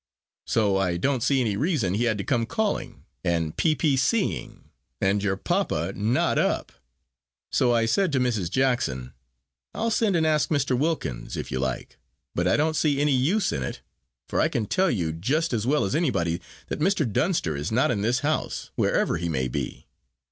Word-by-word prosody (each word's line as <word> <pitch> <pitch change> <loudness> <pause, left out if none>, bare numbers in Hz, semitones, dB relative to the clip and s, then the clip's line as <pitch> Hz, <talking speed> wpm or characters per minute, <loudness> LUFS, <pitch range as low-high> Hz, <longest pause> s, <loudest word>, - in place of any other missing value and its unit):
so 105 -4 +2
I 90 -3 0
don't 130 +6 0
see 135 +2 +2
any 110 -5 0
reason 130 - 0
he 115 +4 +1
had 110 -3 +1
to 100 - -3
come 115 -1 0
calling, 215 - -2 0.2
and 85 -3 0
P. 155 -2 +2
P. 150 -4 +2
C. 190 - +2
ing, - - -11 0.3
and 100 +1 +2
your 95 -1 0
papa 85 -1 -1
not 110 +5 +1
up. - - 0 0.8
So 125 - +3
I 115 -1 +3
said 190 - +2
to 135 - +3
Mrs. 110 -9 0
Jackson, 120 - 0 0.6
'I'll 230 +1 0
send 215 -4 +2
and 160 -1 +2
ask 155 -1 +2
Mr. 145 -4 +1
Wilkins, 130 - -2
if - - -5
you 65 - -1
like, 65 -1 -4 0.3
but 90 +1 0
I - - +3
don't 155 +2 +1
see 145 -3 +2
any 145 -1 +3
use 175 +11 +2
in 70 - -2
it, 65 - -5 0.5
for - - 0
I - - +4
can 115 - -1
tell 190 - +2
you 85 - 0
just 135 - 0
as 115 0 -1
well 145 -4 +2
as 95 - -2
anybody, 90 - 0 0.3
that - - -3
Mr. 175 -1 +2
Dunster 110 - 0
is 75 +6 -3
not 130 +5 +3
in 105 -4 -1
this 120 +4 +1
house, 155 +2 -2
wherever - - +1
he 85 +1 -3
may 65 -5 0
be.' - - -4
120 Hz, 195 wpm, -25 LUFS, 95-150 Hz, 0.8 s, I